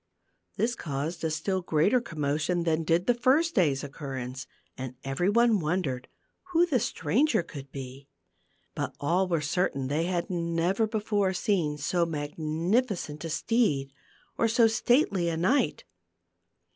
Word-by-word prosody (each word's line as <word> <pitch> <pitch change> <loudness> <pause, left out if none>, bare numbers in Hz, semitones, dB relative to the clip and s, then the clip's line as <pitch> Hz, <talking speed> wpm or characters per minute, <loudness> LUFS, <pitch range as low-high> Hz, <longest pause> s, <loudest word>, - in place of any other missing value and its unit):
This 235 +2 +1
caused 155 - -4
a 160 - +1
still 185 +5 -1
greater 175 +9 +2
commotion 155 -1 -1
than 165 -1 +1
did 165 +2 +1
the 245 - +4
first 275 +8 +2
day's 145 -7 +2
occurrence, 135 -3 -6 0.3
and 130 -1 -6
every 135 +8 0
one 230 0 +4
wondered 150 -6 -2 0.5
who 340 +1 +5
the 290 -8 +1
stranger 210 - +1
could 140 -4 -10
be. 135 0 -8 0.7
But - - -4
all 175 +6 +1
were 170 -3 0
certain 150 -2 0
that - - -2
they 165 +2 +1
had 175 -1 -1
never 175 +4 0
before 210 -3 0
seen 175 -7 0
so 170 +4 0
magnificent 160 - -1
a - - -3
steed, 155 - +1 0.5
or 230 - +4
so 230 +1 +4
stately 225 - +2
a 165 - -2
knight. 215 - +1
170 Hz, 145 wpm, -28 LUFS, 150-210 Hz, 0.7 s, who